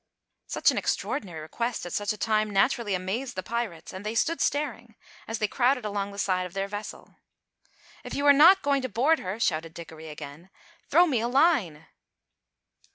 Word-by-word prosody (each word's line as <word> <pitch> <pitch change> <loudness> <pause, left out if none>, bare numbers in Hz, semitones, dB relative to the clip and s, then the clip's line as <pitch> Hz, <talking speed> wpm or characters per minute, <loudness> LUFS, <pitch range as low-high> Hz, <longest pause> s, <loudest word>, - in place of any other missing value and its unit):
Such - - +2
an - - -1
extraordinary 175 - -3
request 230 +10 -3
at 175 - -6
such 205 -1 0
a 215 - -5
time 215 0 +1
naturally 205 0 +1
amazed 215 +8 -3
the 185 - -4
pirates, 230 -8 -4
and 185 +1 -7
they 215 +2 -4
stood 315 +6 +1
staring, 280 -6 -2 0.3
as 225 - -3
they 215 - 0
crowded 250 +1 +1
along 200 -1 -2
the 200 - -11
side 185 -2 0
of 175 - -17
their 195 0 -2
vessel. 205 +1 -8 0.9
"If - - -6
you 285 - -1
are 285 - +8
not 345 +7 +7
going 280 -1 +2
to 255 - -3
board 275 +9 +2
her," 190 +4 -5
shouted 160 -6 -1
Dickory 160 -1 -9
again, 150 +3 -10 0.4
"throw 345 +5 +6
me 275 -9 +1
a 235 - -1
line!" 245 - +2
215 Hz, 185 wpm, -27 LUFS, 185-260 Hz, 0.9 s, are